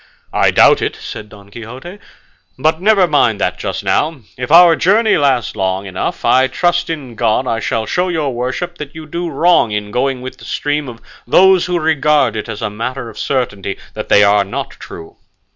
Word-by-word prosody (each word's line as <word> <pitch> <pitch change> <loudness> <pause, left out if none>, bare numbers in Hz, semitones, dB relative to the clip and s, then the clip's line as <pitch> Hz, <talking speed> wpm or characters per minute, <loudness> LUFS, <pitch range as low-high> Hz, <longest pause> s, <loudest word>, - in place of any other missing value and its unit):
"I - - +3
doubt - - +5
it," - - -2
said 105 - -9
Don 100 -1 -16
Quixote, 125 - -10 0.6
"but 155 +5 0
never 200 -2 +4
mind 125 - +1
that - - -1
just - - -4
now; 155 -3 0
if 125 +2 -5
our 170 0 +7
journey 210 - +3
lasts 135 -7 +1
long 95 +1 -2
enough, 95 -2 -4
I 130 +1 +4
trust 175 +5 0
in 145 -7 -5
God 115 +3 0
I 115 -2 -1
shall 110 0 -2
show 180 - -1
your 155 -6 -1
worship 130 +9 -4
that 150 -1 -8
you 160 -1 -8
do 170 +3 -4
wrong 165 -3 +3
in 105 0 -4
going 130 +2 -1
with 130 - -8
the - - -14
stream 145 -1 -2
of 115 -1 -11 0.3
those 185 +5 +4
who 180 -1 0
regard 150 -6 +2
it 110 - -5
as 105 - -6
a - - -1
matter 115 +3 -5
of 105 - -12
certainty 100 -8 -2 0.2
that - - -7
they 105 - +6
are 100 0 +4
not 100 - -5
true." 80 - -12
130 Hz, 195 wpm, -16 LUFS, 110-165 Hz, 0.6 s, our